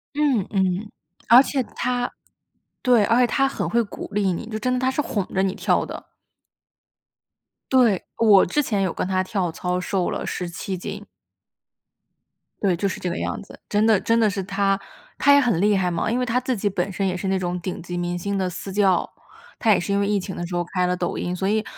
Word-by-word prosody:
嗯， 275 -10 +2
嗯， 190 +1 0 0.4
而 240 +2 +10
且 270 -2 -1
他 245 0 -1 0.7
对， 245 -5 +4
而 230 +4 +3
且 245 - +4
他 270 +3 +2
很 270 - -3
会 235 0 +2
鼓 205 - -8
励 200 -2 +1
你， 200 - -5
就 215 - -3
真 255 +3 0
的， 250 - 0
他 260 0 +1
是 295 - 0
哄 205 -8 -2
着 190 0 +2
你 190 - 0
跳 - - +1
的。 - - -9 1.6
对， 235 -8 +4
我 210 -4 +6
之 295 +12 +1
前 205 -6 -1
有 185 -3 0
跟 - - -2
他 185 -1 +1
跳 185 -2 -2
操， 180 +2 -2
瘦 180 0 -1
了 - - -3
17 180 +2 -4
斤。 - - -7 1.5
对， 190 -4 +2
就 200 +4 -1
是 185 - -4
这 180 - -2
个 170 - -3
样 - - -3
子， - - -14
真 210 +1 +2
的 220 -4 +4
真 230 +4 +2
的 220 -2 +4
是 200 -1 -3
他 195 0 0 0.4
他 285 - +5
也 285 - +7
很 230 -10 +1
厉 205 -1 +3
害 180 -1 0
嘛。 170 +5 -1
因 240 - 0
为 250 - 0
他 245 +1 +1
自 255 -1 -2
己 205 - -1
本 190 0 -2
身 195 +1 -1
也 185 - -1
是 190 +2 -4
那 190 0 +1
种 180 -1 -2
顶 180 0 -5
级 175 0 -5
明 175 0 -2
星 200 +3 -3
的 185 -1 0
私 190 +2 -7
教， 195 -3 +3 0.5
他 225 - +3
也 190 - +2
是 200 +3 -2
因 200 - +2
为 200 - +1
疫 205 0 +1
情 190 0 -6
的 175 - -4
时 175 - -5
候 175 -1 0
开 180 -1 +1
了 180 - 0
抖 175 - -2
音。 180 - -2
所 190 +1 -2
以 215 +1 +1
200 Hz, 245 characters per minute, -23 LUFS, 180-225 Hz, 1.6 s, 而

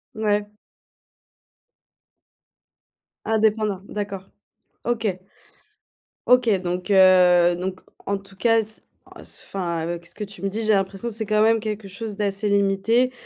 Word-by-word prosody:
Ouais. 210 -1 -1 2.7
Indépendant? 215 -3 +1
D'accord. 200 -2 -5 0.5
OK. 220 -6 -1 1.1
OK, 250 -2 +5
donc 180 0 -3
heu, 180 -2 +6
donc 185 +1 -4 0.2
en 200 0 -1
tout 195 0 -14
cas, 225 0 +3
c 215 +1 -2 0.3
enfin, 175 -3 -5
avec 170 +1 -4
ce - - -9
que 210 - -5
tu 205 +1 -10
me 195 - -1
dis, 215 +3 -3
j'ai 215 - +2
l'impression 195 +4 -1
que - - -6
c'est 220 +1 -1
quand 215 0 +2
même 225 0 +4
quelque 210 -2 -5
chose 210 +2 -6
d'assez 200 0 -1
limité 200 +5 +2
200 Hz, 130 wpm, -23 LUFS, 190-220 Hz, 2.7 s, heu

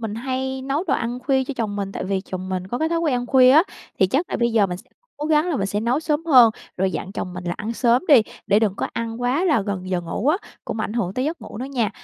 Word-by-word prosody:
mình 220 -2 -4
hay 260 +2 -3
nấu 275 +6 -1
đồ 360 - +1
ăn 240 +2 -2
khuya 265 0 +1
cho 280 - -5
chồng 210 -3 -2
mình 195 -1 -3
tại - - -4
vì 190 0 -1
chồng 185 -1 -6
mình 185 -1 -3
có 240 +6 -3
cái 315 - +1
thói 335 0 0
quen 320 -5 +1
ăn 245 0 -2
khuya 255 0 +6
á, 310 +5 +7 0.4
thì 190 - +5
chắc 275 - -1
là - - -1
bây 235 -1 +1
giờ 215 -3 +4
mình 180 -1 -4
sẽ - - -17 0.3
cố 295 - -4
gắng 310 +2 +3
là 300 - 0
mình 195 - -1
sẽ 205 +1 -2
nấu 245 +6 +1
sớm 315 0 -1
hơn, 250 -7 +7 0.3
rồi 190 +1 +1
dặn 190 0 -5
chồng 180 - -4
mình 180 0 -7
là 175 -1 -2
ăn 220 +2 -4
sớm 235 +1 +2
đi 275 -7 +8 0.2
để 205 - +4
đừng 215 -3 +1
có - - -2
ăn 230 0 -4
quá 255 +8 +1
là 310 -10 +3
gần 190 -2 -4
giờ 180 -1 0
ngủ 175 +9 -2
á, 310 - +4 0.3
cũng 220 - -4
ảnh 210 - -3
hưởng 200 -6 -2
tới 255 - -1
giấc 320 +2 -3
ngủ - - -9
nữa 250 - -3
nha. 255 -6 -1
235 Hz, 305 wpm, -22 LUFS, 200-275 Hz, 0.4 s, đi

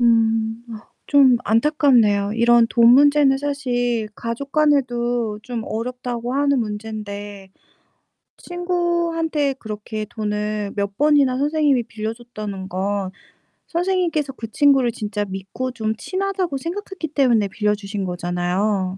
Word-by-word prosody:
음 225 -1 +2
아 225 0 -10 0.2
좀 275 -4 +5
안타깝네요. 225 -5 +3
이런 235 +1 +4
돈 235 -1 +5
문제는 285 -1 +5
사실 245 -5 -1
가족 240 +4 -5
간에도 245 -7 +1
좀 240 -3 -5
어렵다고 245 +1 -4
하는 280 0 +2
문제인데 210 -2 -6 0.9
친구한테 340 -4 -1
그렇게 215 0 -6
돈을 210 -2 -3
몇 200 -1 -3
번이나 285 -2 +3
선생님이 290 -3 +2
빌려 220 0 -5
줬다는 210 -5 -7
건 195 +1 -2 0.6
선생님께서 345 -5 0
그 230 -4 -8
친구를 265 -1 +3
진짜 210 -1 -3
믿고 195 +7 -5
좀 220 -2 -2
친하다고 375 -4 -2
생각했기 350 +1 -5
때문에 245 -8 +2
빌려주신 205 -1 -2
거잖아요. 180 +2 -1
235 Hz, 280 characters per minute, -21 LUFS, 210-285 Hz, 0.9 s, 좀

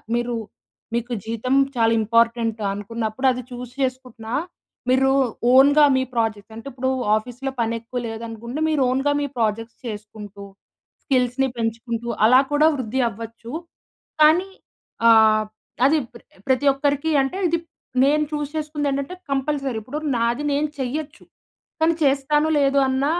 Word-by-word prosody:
మీరు 240 0 -1 0.6
మీకు 240 +1 -2
జీతం 230 +4 -1 0.2
చాలా 225 -1 +3
ఇంపార్టెంటా 230 -1 +1
అనుకున్నప్పుడు 220 +4 -2
అది 250 0 -4
చూజ్ 245 0 -7
చేసుకుంటున్నా, 250 -3 -3 0.5
మీరు 265 +1 +4 0.4
ఓన్‌గా 285 +3 +7
మీ 260 - +1
ప్రాజెక్ట్స్ 220 -2 -2
అంటిప్పుడు 260 +2 -4 0.3
ఆఫీస్‌లో 250 +5 -4
పని 230 0 0
ఎక్కువ 245 +2 -5
లేదనుకుంటే 230 +3 -6
మీరు 305 -3 +1
ఓన్‌గా 270 +3 +1
మీ - - 0
ప్రాజెక్ట్స్ 225 0 -2
చేసుకుంటూ, 210 -2 -8 0.6
స్కిల్స్‌ని 260 0 +1
పెంచుకుంటూ 230 +1 -3 0.2
అలా 250 +3 +7
కూడా 295 +2 +4
వృద్ధి 260 0 -2
అవ్వచ్చు. 230 +2 -9 0.7
కానీ 320 +5 +5 0.6
ఆహ్, 220 -1 +6 0.4
అది 300 +4 +4 0.5
ప్రతి 260 +2 +2
ఒక్కరికి 285 +2 0
అంటే 270 +6 -2
ఇది 335 +1 0 0.5
నేను 300 +2 +3
చూ‌జ్ 295 -1 -3
చేసుకుంది 300 -1 -2
ఏంటంటే 280 +6 -3 0.2
కంపల్సరీ 275 -2 -1
ఇప్పుడు 255 +8 -5 0.2
నాది 235 +4 0
నేను 295 +2 0
చేయొచ్చు, 290 +4 -4 0.6
కానీ 325 +1 +4
చేస్తానో 290 +2 +2
లేదో 275 0 +3
అన్న 265 +1 0
250 Hz, 125 wpm, -22 LUFS, 230-280 Hz, 0.7 s, ఓన్‌గా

